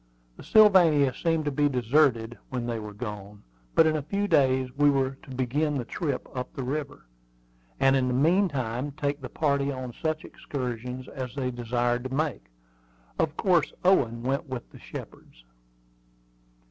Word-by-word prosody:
The - - -12
Sylvania 175 - +5
seemed 165 +2 0
to 145 - 0
be 145 +1 +2
deserted 125 -2 +2
when 125 -2 -3
they 120 -1 -2
were 105 -1 -7
gone; 105 -2 -8 0.3
but 165 - +6
in 155 0 +2
a 155 - -1
few 200 +8 -2
days 130 -5 +3
we 145 0 +4
were 135 -2 +1
to 160 - -16
begin 135 +4 0
the 125 - -3
trip 145 -2 -3
up 125 -2 -4
the 135 - -4
river, 145 +2 -4 0.7
and 135 0 +4
in 130 -1 +2
the 125 - 0
meantime 140 - +1
take 145 0 -2
the 130 - -6
party 140 -2 0
on 130 -2 -6
such 155 +2 -3
excursions 125 -1 -5
as 130 -1 -6
they 130 -2 -1
desired 120 +1 -1
to 130 - -4
make. 150 - -1 0.7
Of 160 -1 0
course 175 -6 +2
Owen 120 -11 +3
went 135 +3 -1
with 130 -2 -6
the - - -13
Shepards. - - -11
135 Hz, 165 wpm, -27 LUFS, 125-150 Hz, 0.7 s, but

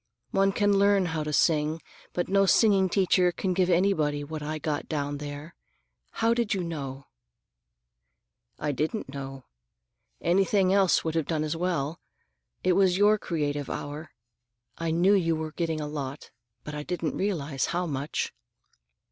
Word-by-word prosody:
One 195 0 +3
can 205 0 +2
learn 200 -1 +4
how 160 -2 -2
to 150 - -3
sing, 155 +1 +2 0.3
but 175 - -2
no 195 0 +3
singing 195 -3 +4
teacher 185 -1 +3
can 185 +2 -2
give 180 0 +2
anybody 160 -5 +2
what 155 +1 -6
I 155 +1 -3
got 150 -1 -3
down 145 -2 -2
there. 145 +2 -7 0.6
How 225 +1 +2
did 235 -4 0
you 185 - -2
know?" 140 -5 -5 1.5
"I 150 - -1
didn't 155 - -2
know. 135 -1 -7 0.7
Anything 190 +1 +2
else 195 -2 +4
would 160 - -2
have 160 -3 -1
done 155 -2 0
as 155 +1 -2
well. 165 -3 -1 0.6
It 185 - +3
was 185 -1 +3
your 210 +1 +4
creative 145 -5 -2
hour. 150 +2 -5 0.7
I 165 0 -3
knew 175 +5 +4
you 165 -5 +2
were 155 0 -4
getting 165 -1 -2
a 150 - -3
lot, 145 -2 -6 0.3
but 150 - -7
I 150 - -4
didn't 170 0 -3
realize 155 -9 -1
how 175 +1 -1
much." 145 -2 -3
165 Hz, 155 wpm, -27 LUFS, 150-190 Hz, 1.5 s, learn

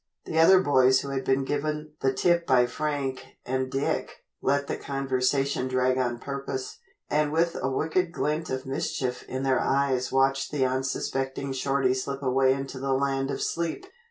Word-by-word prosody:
The 160 - -1
other 185 +3 +7
boys 130 -3 +4
who 140 - -6
had 135 -1 -2
been 135 +1 +1
given 150 +1 -2
the 135 - +3
tip 170 +5 +2
by 125 -2 +5
Frank 140 0 -3 0.2
and 130 0 -2
Dick, 135 +1 -2 0.2
let 140 0 +1
the - - -3
conversation 135 0 0
drag 130 0 +1
on 120 -2 0
purpose, 135 0 -5 0.3
and 150 0 +1
with 170 +2 +1
a 130 - 0
wicked 160 +6 0
glint 155 -1 -2
of 130 0 -3
mischief 135 -3 -2
in 130 +1 -3
their 130 -2 +2
eyes 135 -2 +1
watched 135 +1 +2
the 140 -3 +1
unsuspecting 135 +1 -2
Shorty 130 0 +1
slip 135 +2 -4
away 130 0 +3
into 135 0 -3
the 135 0 0
land 135 0 0
of - - -2
sleep. 170 - -2
135 Hz, 170 wpm, -27 LUFS, 130-145 Hz, 0.3 s, other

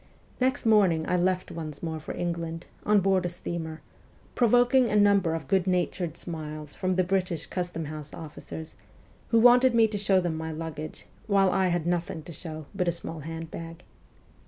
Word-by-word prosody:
Next 260 +2 +1
morning 190 -8 +4
I 180 - +1
left 185 +1 0
once 155 -3 -7
more 160 -1 -3
for 155 - -7
England, 170 -1 -3 0.2
on 210 -1 +5
board 190 -1 +2
a 175 - -1
steamer, 165 -2 -5 0.5
pro 240 - +3
voking 245 +1 +4
a 210 - 0
number 200 -5 +4
of 160 -4 -5
good 190 -1 +2
natured 175 -2 0
smiles 155 -3 -6
from 185 0 -1
the 185 - +3
British 180 -3 -1
custom 175 -3 -3
house 150 -1 -7
officers, 160 0 -8 0.5
who 230 - +3
wanted 245 +1 +6
me 225 -1 +6
to 210 -1 -4
show 195 -1 +3
them 175 -3 -1
my 160 0 -4
luggage, 155 -1 -6 0.2
while 195 -2 +4
I 190 -1 +2
had 175 -2 0
nothing 175 -1 -1
to 170 - -9
show 155 0 -7
but 185 -3 -1
a - - +4
small 165 -1 -7
hand 165 +2 -6
bag. 165 +1 -8
175 Hz, 185 wpm, -27 LUFS, 160-195 Hz, 0.5 s, wanted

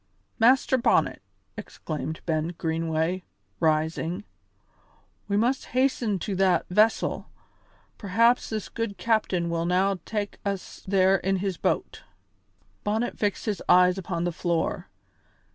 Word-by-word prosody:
"Master 255 +2 +4
Bonnet," - - +2 0.3
exclaimed 155 0 -6
Ben 160 +1 -1
Greenway, 165 +2 -1 0.4
rising, 160 +4 0 1.0
"we 200 0 0
must 245 +5 +1
hasten 255 -6 +1
to 195 +3 -4
that 185 -3 +3
vessel; 215 +4 +2 0.7
perhaps 230 +5 +2
this 215 -2 -3
good 230 -3 -4
captain 210 -6 +1
will 170 0 -1
now 190 +2 +2
tak' 210 -2 -4
us 200 -2 -4
there 190 0 +4
in 195 +1 0
his 190 -1 -2
boat." - - -1 0.8
Bonnet 220 +3 -1
fixed 205 -2 -1
his 210 -5 -2
eyes 180 +1 +5
upon 170 -2 -3
the 175 - 0
floor. 170 0 -2
190 Hz, 120 wpm, -26 LUFS, 170-215 Hz, 1.0 s, eyes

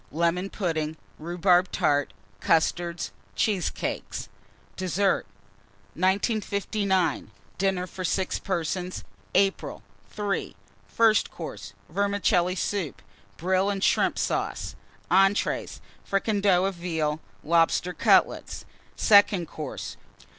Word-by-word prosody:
Lemon 170 +4 0
Pudding. 160 -6 -2 0.2
Rhubarb 175 +2 +2
Tart. 145 -5 +1 0.3
Custards. 170 - +1 0.2
Cheesecakes. 200 -5 -2 0.5
DESSERT. 185 - 0 0.7
1959. 195 - 0 0.3
DINNER 190 -1 +1
FOR 185 +1 -7
6 185 +1 0
PERSONS 180 0 -3 0.3
(April). 195 -1 +1 0.3
III. 205 -1 -2 0.3
FIRST 225 -2 +3
COURSE. - - -8
Vermicelli 200 -3 +1
Soup. 190 -4 -2 0.4
Brill 185 +3 +1
and 200 -1 -2
Shrimp - - +3
Sauce. - - -2 0.4
ENTREES. 195 +2 +2 0.2
Fricandeau 195 -2 +2
of 195 - 0
Veal. 160 -4 -2 0.2
Lobster 170 +2 +2
Cutlets. - - +2 0.3
SECOND 200 -5 +5
COURSE. 150 -4 -6
185 Hz, 90 wpm, -26 LUFS, 170-200 Hz, 0.7 s, SECOND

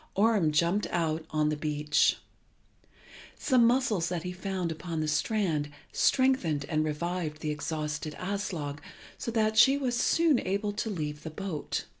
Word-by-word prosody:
Orm 205 -6 +3
jumped 170 +7 +2
out 160 -2 -1
on 155 -1 +1
the 150 - 0
beach. 150 0 +2 1.2
Some 250 -4 +4
mussels 230 -9 +2
that 175 -2 -3
he 180 - -4
found 185 -2 -3
upon 160 +1 -4
the 155 - -1
strand 155 -1 0 0.2
strengthened 225 - +2
and 155 -1 +1
revived 155 0 -3
the 155 - -1
exhausted 150 0 -3
Aslog 180 -7 -3 0.4
so - - -3
that 220 -1 +2
she 270 +4 +7
was 255 -4 -1
soon 315 +2 +3
able 200 +2 -1
to 210 +2 -3
leave 150 -6 -4
the 160 - -6
boat. 160 -2 -4
170 Hz, 150 wpm, -29 LUFS, 150-210 Hz, 1.2 s, she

